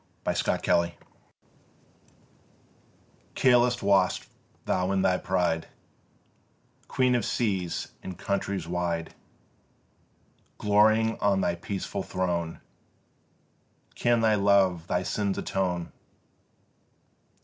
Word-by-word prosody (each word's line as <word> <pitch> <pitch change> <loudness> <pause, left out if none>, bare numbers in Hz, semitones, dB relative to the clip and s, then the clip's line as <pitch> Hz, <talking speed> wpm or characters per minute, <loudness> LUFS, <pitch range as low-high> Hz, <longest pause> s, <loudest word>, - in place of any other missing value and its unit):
BRITANNIA - - 0
VICTRIX 85 0 +2 2.4
Careless 125 -2 +3
wast 95 -3 +2 0.4
thou 90 +1 0
in 95 -1 +1
thy 90 0 +2
pride, 90 -3 0 1.2
Queen 125 -1 +2
of 120 - +1
seas 95 -7 -1
and 95 - -7
countries 100 -3 -2
wide, 85 -1 -2 1.4
Glorying 110 +2 +3
on 100 -1 +2
thy - - +1
peaceful 95 +3 -4
throne: 90 -3 -2 1.3
Can 120 -1 +2
thy 110 -1 +4
love 100 -4 +3
thy 90 0 0
sins 100 0 -1
atone? 90 -3 -2
95 Hz, 85 wpm, -27 LUFS, 90-105 Hz, 2.4 s, thy